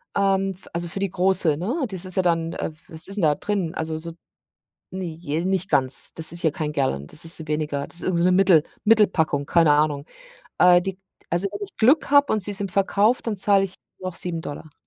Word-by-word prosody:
ähm, 195 -1 +1
f 185 0 -13
also 170 +1 -3
für 190 - -6
die 195 -1 -1
große, 180 -4 +2
ne, 240 - -2
das 190 -1 -4
ist 185 - -2
ja 190 - +3
dann 165 -2 0
äh, - - -3
f 155 0 -13
was 160 0 -6
ist 195 - -3
denn 185 - -1
da 150 -1 +4
drin? 190 -4 -3
Also 160 0 -3
so 165 +1 -6 0.8
ne, 185 0 -5
j 160 0 -4
nicht 190 0 -1
ganz, 130 -4 0
das 160 0 +2
ist 170 - -2
hier 160 - +2
kein 150 -1 -4
Gallon, 130 - -1
das 150 - -4
ist 165 -1 -1
weniger, 150 -2 -2
das - - -5
ist - - -2
irgend 185 -2 0
so 170 - +2
'ne 185 - +4
Mittel 180 -4 +5 0.2
Mittelpackung, 185 -10 +3
keine 165 -1 +4
Ahnung. 145 -1 +1 0.5
Äh 180 0 +6
die 190 0 -5 0.3
also 175 +4 0
wenn 205 - -6
ich 205 - -8
Glück 275 +8 +3
habe 285 0 +5
und 215 - +1
sie 205 +2 -1
sind 200 -2 -4
verkauft, 200 +5 +1
dann 220 - -1
zahle 195 0 +4
ich 185 - -9 0.3
noch 185 -2 -5
7$. 160 -3 -5
175 Hz, 230 wpm, -23 LUFS, 160-195 Hz, 0.8 s, Äh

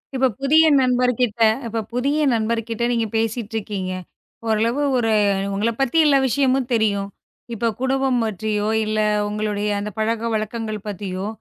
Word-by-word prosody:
இப்ப 260 0 +3
புதிய 310 +4 +5
நண்பர் 250 -1 +2
கிட்ட, 235 -2 0 0.3
இப்ப 225 0 -2
புதிய 275 +5 0 0.2
நண்பர் 225 0 0
கிட்ட 230 +1 -2
நீங்கப் 230 -3 -1
பேசிட்டு 225 0 -2
இருக்கீங்க. 195 -3 -4 0.6
ஓரளவு 225 +5 +1 0.2
ஒரு 225 -2 +1 0.4
உங்கள 210 +4 0
பத்தி 270 +4 +1
எல்லா 285 -2 +5
விஷயமும் 265 0 +1
தெரியும். 205 -3 +1 0.5
இப்ப 230 +1 0
குடும்பம் 265 -1 +1
மற்றியோ 210 0 -2 0.2
இல்ல 215 0 -1 0.3
உங்களுடைய 210 0 -2
அந்தப் 210 0 -6
பழக்கவழக்கங்கள் 220 -1 -2
பத்தியோ, 195 -1 -4
225 Hz, 135 wpm, -21 LUFS, 210-250 Hz, 0.6 s, புதிய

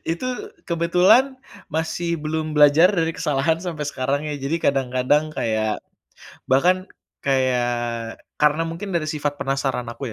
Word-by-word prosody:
Itu 170 - -5 0.4
kebetulan 180 +10 +3 0.3
masih 170 +2 -2
belum 155 0 -3
belajar 150 +4 +7
dari 165 -5 0
kesalahan 160 -1 0
sampai 165 -4 -4
sekarang 140 0 -1
ya. 150 -1 -3
Jadi 140 +5 -1
kadang-kadang 135 +2 +2
kayak 110 -7 -2 0.6
bahkan 180 +8 +3 0.4
kayak 120 -3 0 0.2
karena 150 +2 +3
mungkin 180 +4 -6
dari 165 -3 -1
sifat 145 -1 -3
penasaran 135 -3 -1
aku 115 0 -6
150 Hz, 125 wpm, -22 LUFS, 130-165 Hz, 0.6 s, belajar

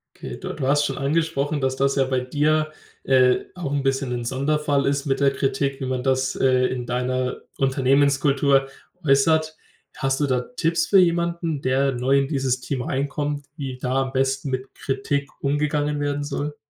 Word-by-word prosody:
Okay, - - -7
du - - -5
du 135 -3 -3
hast 145 +1 +3
schon 135 - -3
angesprochen, 145 0 0
dass 130 0 0
das 140 +1 +1
ja 135 - +3
bei 130 -1 0
dir, 155 +4 +1 0.3
äh, 130 -1 +3
auch 170 -6 -4
'n 145 -1 0
bisschen 135 -1 0
'n 120 -1 -3
Sonderfall 140 +2 0
ist 140 0 0
mit 135 0 0
der 140 -1 +4
Kritik, 135 0 -1
wie 135 - -3
man 130 -1 -2
das, 130 0 +1
äh, 130 -1 +3
in 125 -1 -4
deiner 125 +1 -2 0.2
Unternehmenskultur 135 +1 +3 0.4
äußert. 155 +3 +3 0.4
Hast 135 +1 -1
du 145 - +1
da 130 -2 +1 0.2
Tipps 165 +1 +1
für 195 - +6
jemanden, 170 -3 +1
der 135 +1 +1
neu 130 +3 +2
in 135 - 0
dieses 135 -3 0
Team 130 0 -3
reinkommt, 145 +2 -2
wie 135 -3 -5
da 130 +1 0
am 130 - -5
besten 135 +1 0
mit 130 0 -4
Kritik 140 +1 -2
umgegangen 145 +1 0
werden 145 0 -1
soll? 145 +1 -4
140 Hz, 180 wpm, -23 LUFS, 130-145 Hz, 0.4 s, für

